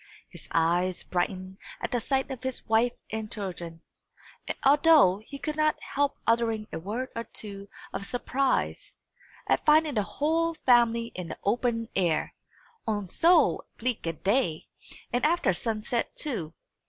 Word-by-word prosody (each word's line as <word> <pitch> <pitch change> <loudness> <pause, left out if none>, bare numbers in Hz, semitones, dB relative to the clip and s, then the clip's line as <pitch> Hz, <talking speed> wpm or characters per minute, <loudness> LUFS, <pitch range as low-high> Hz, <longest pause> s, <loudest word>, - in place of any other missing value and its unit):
His - - -12
eyes 175 +2 +1
brightened 185 +1 -3 0.2
at - - -4
the 245 - +1
sight 270 +1 0
of 260 -2 -6
his 260 -1 -3
wife 225 +2 +3 0.2
and 220 0 -4
children, 175 -5 -6 0.8
although 285 - +6
he 280 - -7
could 305 +2 -3
not 310 0 +2
help 285 0 -1
uttering 225 -2 +1
a - - -3
word 220 +9 -4
or 230 0 -3
two 200 -2 -8 0.3
of - - -3
surprise, 255 +2 -1 0.5
at - - +1
finding 305 0 +5
the 215 - +2
whole 315 +11 0
family 235 -3 +3
in 180 -2 -6
the - - -6
open 230 +1 0
air, 170 -5 +1 0.5
on 205 -4 -1
so 335 - +4
bleak 240 -6 -2
a 165 - 0
day, 190 - 0 0.5
and 245 - +1
after 315 - +3
sunset 225 +4 -2
too. 195 - -3
230 Hz, 145 wpm, -28 LUFS, 190-270 Hz, 0.8 s, although